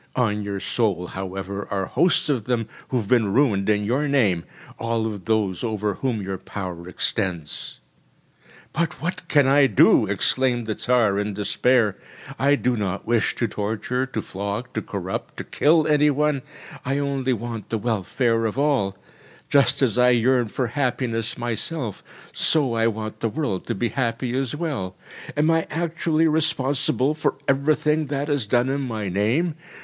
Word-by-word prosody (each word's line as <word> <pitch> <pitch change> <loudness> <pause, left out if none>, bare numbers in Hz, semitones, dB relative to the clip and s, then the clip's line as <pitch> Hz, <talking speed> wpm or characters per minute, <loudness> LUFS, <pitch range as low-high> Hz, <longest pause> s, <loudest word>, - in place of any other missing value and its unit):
On 105 -4 +1
your 100 -1 -3
soul, 100 -5 0
however, 95 +2 -5
are 95 -1 -1
hosts 170 - +2
of 130 -8 0
them, 120 -3 -1 0.2
who 130 - 0
have 110 -5 -2
been 115 -4 +3
ruined 110 -7 +2
in 105 -1 +2
your 135 +7 +1
name, 105 -12 +2 0.3
all 115 -1 -1
of 105 -5 -5
those 105 -4 0
over 105 -3 -1
whom 120 -5 -2
your 95 -1 -4
power 90 -4 -6
extends. 90 -5 -2 0.9
“But 165 -4 -1
what 165 +6 -3
can 145 -3 +4
I 135 +1 +5
do?‚ÄĚ 105 - +5
exclaimed 125 -3 +2
the 110 - -1
Tsar 110 -4 +2
in 105 -1 -2
despair. 105 +1 +2 0.4
“I 140 +1 +4
do 125 -3 0
not 100 -3 -3
wish 115 -2 +1
to 120 - 0
torture, 110 +5 -2
to 115 -5 -4
flog, 100 +5 -4
to - - -2
corrupt, - - -5
to - - -4
kill 155 +1 +3
any 150 -1 +4
one! 145 -1 +1 0.4
I 135 +2 -1
only 135 -2 0
want 115 -1 -5
the 115 - 0
welfare 115 +2 0
of 110 - -5
all. 135 -10 +1 0.5
Just 140 0 +4
as 125 -1 +2
I 125 0 +6
yearn 125 0 +3
for 125 +4 -2
happiness 120 -3 -1
myself, 120 - -3 0.3
so 145 -7 +2
I 115 0 +2
want 110 -1 -4
the 115 - 0
world 105 - -3
to - - -1
be 115 +4 0
happy 120 -1 -1
as 135 +1 -1
well. 140 - -3 0.4
Am 155 +2 +3
I 165 0 +1
actually 165 0 +1
responsible 150 -3 +1
for 155 - -1
everything 150 +2 +2
that 145 +1 -2
is 140 -7 0
done 120 +3 +2
in 140 +1 -1
my 110 -6 -3
name? 115 - +1
120 Hz, 165 wpm, -23 LUFS, 105-140 Hz, 0.9 s, I